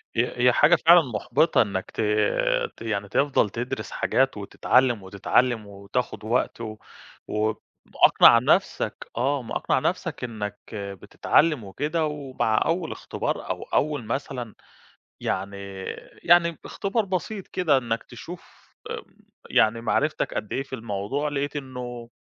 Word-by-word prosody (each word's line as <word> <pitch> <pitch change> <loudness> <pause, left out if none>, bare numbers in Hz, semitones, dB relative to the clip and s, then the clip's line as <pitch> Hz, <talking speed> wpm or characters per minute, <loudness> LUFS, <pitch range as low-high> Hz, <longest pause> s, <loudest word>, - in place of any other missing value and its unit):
هي 120 +1 0
هي 125 +1 +5
حاجة 155 +3 +6
فعلًا 170 +1 +7
مُحبِطة 135 +4 +2
إنك 100 -4 -2
ت - - -3 0.8
ت - - -18
يعني 105 -3 -2
تفضل 135 -4 +2
تدرس 120 +4 -4
حاجات - - +1
وتتعلم، 125 -5 +2
وتتعلم، 105 +3 +1
وتاخد 100 +4 -4
وقت 115 +1 0
و 110 -2 -6 0.5
ومأقنَع 105 0 +4
نَفسك، - - 0
آه، 135 +2 +1
مأقنَع 115 - -1
نَفسك - - -2
إنك 105 -4 -5
بتتعلم 105 - +1
وكده، 150 - -1
ومع 135 -7 -1
أول 165 0 -1
اختبار - - -4
أو - - -3
أول 145 -6 0
مثلًا 125 -2 -4 0.7
يعني 100 +1 -2 0.7
يعني 170 -2 +4
اختبار 210 +2 -1
بسيط 190 +2 -3
كده 160 -7 +2
إنك 115 -2 -2
تشوف، 175 +1 -12 0.2
آمم، - - -4 0.5
يعني 115 +1 +3
معرفتك 150 +6 0
قدّ 105 - -4
إيه 135 - 0
في 135 - -9
الموضوع، 115 +5 -2
لقيت 145 0 -2
إنه 125 -3 -6
125 Hz, 125 wpm, -25 LUFS, 110-150 Hz, 0.8 s, فعلًا